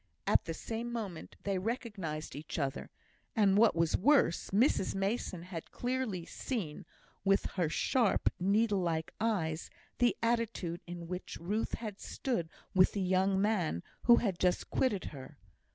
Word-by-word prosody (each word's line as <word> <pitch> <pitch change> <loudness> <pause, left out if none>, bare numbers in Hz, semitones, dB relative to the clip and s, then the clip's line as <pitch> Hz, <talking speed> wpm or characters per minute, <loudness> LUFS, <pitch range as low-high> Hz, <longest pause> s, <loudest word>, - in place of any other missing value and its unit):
At - - +4
the 165 - -3
same 230 +6 -4
moment 205 -8 -5
they 195 -2 0
recognised 195 - -4
each 150 +2 -6
other, 140 -4 -2 0.5
and, 200 -4 +4
what 220 -1 +5
was 165 -1 +2
worse, 250 - +3
Mrs 200 -2 +2
Mason 195 -3 -1
had 175 -2 -7
clearly 245 -8 -2
seen, 190 - -4 0.4
with 195 0 +3
her 175 -5 0
sharp, 230 +6 +2
needle 200 +2 +3
like 165 -3 -1
eyes, 175 -8 0 0.3
the 245 -1 +3
attitude 230 -7 0
in 170 -1 -6
which 180 +1 -5
Ruth 205 +6 -1
had 215 -3 -6
stood 205 -12 -2 0.2
with 185 -1 +5
the 200 - -1
young 190 +1 +2
man 190 - +1 0.2
who 240 - +9
had 200 -7 0
just 180 -1 +1
quitted 210 -9 +1
her. 135 +1 -10
195 Hz, 150 wpm, -33 LUFS, 170-225 Hz, 0.5 s, who